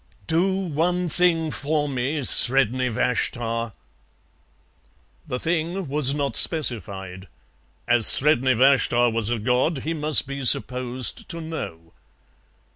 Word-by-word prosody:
"Do 170 - 0
one 180 -1 -2
thing 165 -2 0
for 150 +1 -3
me, 140 +2 -4
Sredni 130 0 +3
Vashtar." 115 -1 -3 1.5
The 125 - -4
thing 170 +3 -3
was 140 0 0
not 140 -5 -3
specified. 95 - +1 0.6
As 120 -2 +4
Sredni 130 -3 +4
Vashtar 120 -2 +2
was 115 -1 0
a 120 - -2
god 125 +6 -2
he 160 - -4
must 150 -3 +2
be 140 0 -7
supposed 125 0 0
to 170 - -6
know. 85 - -9
135 Hz, 115 wpm, -22 LUFS, 120-160 Hz, 1.5 s, As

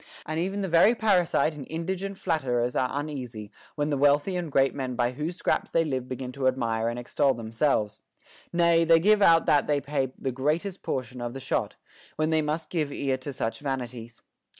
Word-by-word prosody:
325 - - -7
and - - -1
even 195 +2 -2
the 195 - -1
very 180 +7 +5
parasite 180 -8 +2
and 145 -3 -9
indigent 190 +4 -3
flatterers 125 -8 0
are 130 - +1
un 145 +2 -3
easy, 120 -8 -7 0.2
when 150 0 -1
the 145 - +1
wealthy 145 +6 +3
and 175 -4 -3
great 135 0 +3
men 130 -3 -4
by 120 0 +1
whose 150 +7 -4
scraps - - 0
they 165 0 +2
live 130 -4 -3
begin 130 0 -5
to 130 0 -1
admire 115 -3 0
and 120 - -4
extol 130 +2 +1
themselves; 110 -1 -1 0.5
nay, 170 -1 +4
they 165 0 +5
give 210 +4 +4
out 165 -4 +6
that 145 -1 +3
they 145 -1 +2
pay 140 -2 -2
the 130 - -2
greatest 155 +9 -1
portion 125 -1 -4
of 120 +1 -4
the - - -5
shot, - - -2 0.4
when 155 +1 0
they 160 -1 +3
must 155 +2 -3
give 155 -5 -1
ear 135 -1 -1
to 130 +2 -6
such 115 -3 -3
vanities. 125 -4 -5
145 Hz, 205 wpm, -27 LUFS, 125-165 Hz, 0.5 s, out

